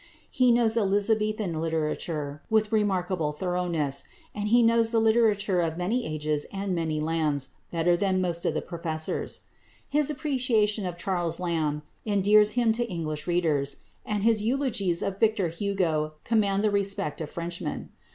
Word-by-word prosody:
He 255 Hz, -1 st, +4 dB
knows 235 Hz, -1 st, +3 dB
Elizabethan 210 Hz, -3 st, +1 dB
literature 155 Hz, -2 st, -2 dB
with 215 Hz, -1 st, +2 dB
remarkable 185 Hz, -7 st, 0 dB
thoroughness, 170 Hz, -5 st, -1 dB, 0.3 s
and 210 Hz, 0 st, -3 dB
he 240 Hz, +2 st, +5 dB
knows 230 Hz, 0 st, +4 dB
the 230 Hz, -, +1 dB
literature 215 Hz, -4 st, +3 dB
of 165 Hz, -1 st, -2 dB
many 220 Hz, +8 st, -1 dB
ages 150 Hz, -1 st, -2 dB
and 195 Hz, -1 st, -3 dB
many 160 Hz, -3 st, -1 dB
lands 155 Hz, -3 st, -1 dB, 0.2 s
better 170 Hz, +1 st, +2 dB
than 190 Hz, 0 st, +1 dB
most 175 Hz, -2 st, -1 dB
of -, -, 0 dB
the -, -, -1 dB
professors. 160 Hz, -2 st, -3 dB, 0.5 s
His 300 Hz, 0 st, +2 dB
appreciation 245 Hz, -, 0 dB
of 175 Hz, -1 st, -5 dB
Charles 175 Hz, -2 st, -1 dB
Lamb 155 Hz, -4 st, -1 dB, 0.2 s
endears 210 Hz, 0 st, +4 dB
him 235 Hz, -2 st, +3 dB
to 235 Hz, +1 st, -2 dB
English 155 Hz, -3 st, -4 dB
readers, 155 Hz, -6 st, 0 dB, 0.2 s
and 210 Hz, -2 st, -2 dB
his 225 Hz, -1 st, +3 dB
eulogies 220 Hz, -7 st, 0 dB
of 195 Hz, 0 st, -3 dB
Victor 215 Hz, -5 st, +2 dB
Hugo 165 Hz, -4 st, -1 dB
command 205 Hz, -3 st, +1 dB
the 215 Hz, -, +2 dB
respect 195 Hz, -7 st, 0 dB
of 155 Hz, -, -4 dB
Frenchmen. 170 Hz, +1 st, -5 dB
190 Hz, 150 wpm, -27 LUFS, 165-215 Hz, 0.5 s, he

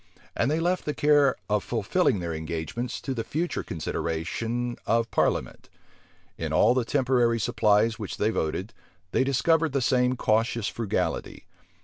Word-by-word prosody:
And 125 Hz, -, +1 dB
they 155 Hz, +2 st, +1 dB
left 180 Hz, +2 st, 0 dB
the 150 Hz, -, -2 dB
care 145 Hz, -2 st, +4 dB
of 105 Hz, -1 st, +1 dB
fulfilling 115 Hz, -, +1 dB
their 85 Hz, -1 st, -3 dB
engagements 80 Hz, +10 st, -4 dB
to 135 Hz, -, -3 dB
the 115 Hz, -3 st, -3 dB
future 170 Hz, +8 st, -2 dB
consideration 110 Hz, +10 st, -3 dB
of 115 Hz, +1 st, +1 dB
parliament. -, -, -1 dB, 0.7 s
In -, -, -3 dB
all -, -, +4 dB
the 125 Hz, -1 st, +1 dB
temporary 120 Hz, -2 st, +2 dB
supplies 110 Hz, 0 st, +2 dB
which 105 Hz, -, -5 dB
they 105 Hz, +2 st, +1 dB
voted, 90 Hz, +4 st, -2 dB, 0.4 s
they -, -, +2 dB
discovered 155 Hz, +3 st, +2 dB
the 140 Hz, -, +2 dB
same 125 Hz, 0 st, +2 dB
cautious 115 Hz, -1 st, +1 dB
frugality. 115 Hz, -4 st, -3 dB
115 Hz, 145 wpm, -26 LUFS, 105-135 Hz, 0.7 s, care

